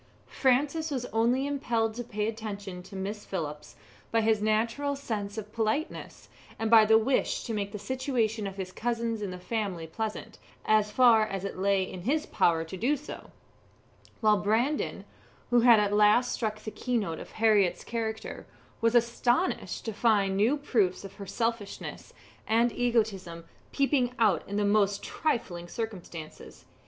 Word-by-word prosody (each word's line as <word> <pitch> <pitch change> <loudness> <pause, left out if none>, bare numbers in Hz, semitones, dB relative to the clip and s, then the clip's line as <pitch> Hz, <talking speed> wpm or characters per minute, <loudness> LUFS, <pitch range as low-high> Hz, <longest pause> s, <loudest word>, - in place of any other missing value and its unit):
Francis 285 +5 +1
was 260 -4 -2
only 240 +4 +2
impelled 235 -6 0
to 240 +2 -5
pay 210 -2 -3
attention 205 -4 -5
to 195 - -12
Miss 205 +2 -4
Phillips 150 -5 -5 0.4
by 230 - +3
his 220 -1 +2
natural 230 +7 0
sense 215 -6 -4
of 210 0 -7
politeness, 225 +7 -3 0.3
and 225 0 -2
by 220 -2 +8
the 220 +1 +6
wish 245 +4 +1
to 230 - -4
make 200 -1 -2
the 210 - -5
situation 230 -2 -1
of 195 0 -8
his 185 -1 -5
cousins 230 0 -2
in 205 - -3
the 180 - -6
family 185 -3 -3
pleasant, 215 +6 -5 0.3
as 215 -1 +3
far 225 -1 +5
as 195 -1 -4
it 200 - -4
lay 195 0 +2
in 185 -1 -7
his 295 - 0
power 165 -1 +2
to 165 +3 -8
do 255 +10 +1
so; 295 - -10 0.9
while 215 -1 +5
Brandon, 225 +9 0 0.5
who 245 - +5
had 235 -2 +7
at 205 -1 +1
last 210 +4 +4
struck 215 -2 -2
the 215 - -7
key 250 +2 -1
note 170 -8 -2
of - - -10
Harriett's 210 -5 +3
character, 220 -2 -4 0.3
was 230 +1 +2
astonished 240 +7 +1
to 225 - -3
find 205 -3 +2
new 225 +9 +3
proofs 210 -10 0
of 195 - -9
her 200 -2 -8
selfishness 230 -1 -4 0.4
and 230 +2 +3
egotism 210 -9 -1 0.3
peeping 270 -3 +1
out 210 -8 +3
in 200 - -2
the 210 - +2
most 200 -1 +2
trifling 185 - -2
circumstances. 175 -7 -7
220 Hz, 165 wpm, -28 LUFS, 200-240 Hz, 0.9 s, by